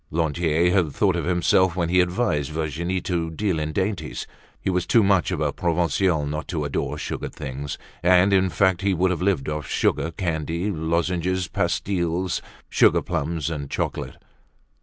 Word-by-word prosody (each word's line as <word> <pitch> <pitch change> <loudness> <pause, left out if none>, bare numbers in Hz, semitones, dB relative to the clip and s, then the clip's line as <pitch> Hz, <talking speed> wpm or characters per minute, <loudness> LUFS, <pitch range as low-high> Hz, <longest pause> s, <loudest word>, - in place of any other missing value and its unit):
Lantier 80 +1 +1
had 90 -6 +2
thought 95 +1 +2
of 85 - -2
himself 90 0 +3
when 85 -2 0
he 90 +1 +3
advised 90 - 0
Virginie 80 +4 -2
to 85 -3 -1
deal 85 +1 -1
in 75 0 -2
dainties. 95 +3 -2 0.3
He 95 - -1
was 90 -1 -1
too 115 - +5
much 95 -3 +3
of - - -2
a - - 0
Provincial 85 -1 +1
not 75 +2 -4
to 80 -4 -2
adore 70 - -2
sugared - - -5
things; 70 +1 -5 0.2
and 90 +2 +5
in 95 -1 +4
fact 95 -1 +2
he 100 -1 +1
would 90 +2 +2
have 85 - -2
lived 90 -7 +1
off 75 -3 -3
sugar 80 - +1
candy, 85 +2 -2
lozenges, 85 +2 0
pastilles, 90 0 -1 0.3
sugar - - +4
plums 80 +1 -2
and 70 -3 -4
chocolate. - - -3
85 Hz, 165 wpm, -24 LUFS, 80-95 Hz, 0.3 s, too